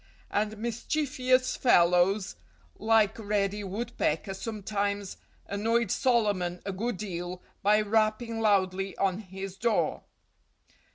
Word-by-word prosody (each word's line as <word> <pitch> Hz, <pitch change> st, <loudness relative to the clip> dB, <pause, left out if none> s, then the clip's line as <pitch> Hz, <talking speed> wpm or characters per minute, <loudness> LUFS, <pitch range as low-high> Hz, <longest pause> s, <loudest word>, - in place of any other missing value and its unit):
And 215 Hz, +1 st, -1 dB
mischievous 255 Hz, +2 st, 0 dB
fellows 180 Hz, -2 st, +3 dB, 0.4 s
like 220 Hz, -1 st, +3 dB
Reddy 205 Hz, -1 st, -1 dB
Woodpecker 200 Hz, -4 st, -2 dB
sometimes 205 Hz, -1 st, -3 dB, 0.3 s
annoyed 225 Hz, +3 st, 0 dB
Solomon 205 Hz, -8 st, +1 dB
a 200 Hz, -, -2 dB
good 220 Hz, +3 st, -2 dB
deal 180 Hz, -3 st, -5 dB, 0.2 s
by 210 Hz, +2 st, +4 dB
rapping 220 Hz, +2 st, 0 dB
loudly 195 Hz, -2 st, +1 dB
on 195 Hz, 0 st, +1 dB
his 190 Hz, -1 st, -7 dB
door. 230 Hz, +2 st, 0 dB
205 Hz, 100 wpm, -28 LUFS, 195-225 Hz, 0.4 s, by